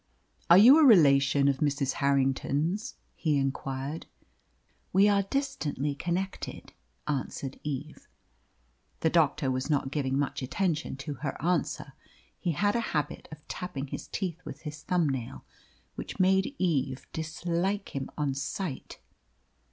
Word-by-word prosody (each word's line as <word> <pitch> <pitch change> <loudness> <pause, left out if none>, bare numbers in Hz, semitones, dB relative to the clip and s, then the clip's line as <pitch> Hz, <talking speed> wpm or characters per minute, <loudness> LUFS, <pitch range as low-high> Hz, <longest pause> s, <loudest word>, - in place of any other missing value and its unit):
"Are 170 - +9
you 250 +10 +9
a - - +6
relation 140 - +6
of 140 -1 +2
Mrs. 140 -2 +1
Harrington's?" 140 - +1 0.2
he 155 -3 0
inquired. 135 +2 -3 0.8
"We 195 +3 +5
are 200 -1 +4
distantly 195 - -2
connected," 180 +6 -4 0.3
answered 135 -1 -3
Eve. 150 +1 -5 0.9
The 160 - +2
doctor 150 -4 +2
was 130 +3 -2
not 140 -3 +1
giving 135 -3 0
much 140 -1 -1
attention 160 +4 -1
to 145 - -3
her 150 - -3
answer. 170 +1 -1 0.5
He 170 - -1
had 205 +7 +1
a - - +2 0.2
habit 150 -1 -3
of 150 -1 -12
tapping 145 -6 -5
his - - -6
teeth 180 -3 -4
with 145 - -8
his 150 -1 -7
thumbnail, 145 -10 -1 0.5
which - - -7
made 190 +7 +3
Eve 140 -7 0
dislike 170 +5 -2
him 135 -1 -3
at 145 -3 0
sight. 145 +2 -4
150 Hz, 130 wpm, -29 LUFS, 140-180 Hz, 0.9 s, Are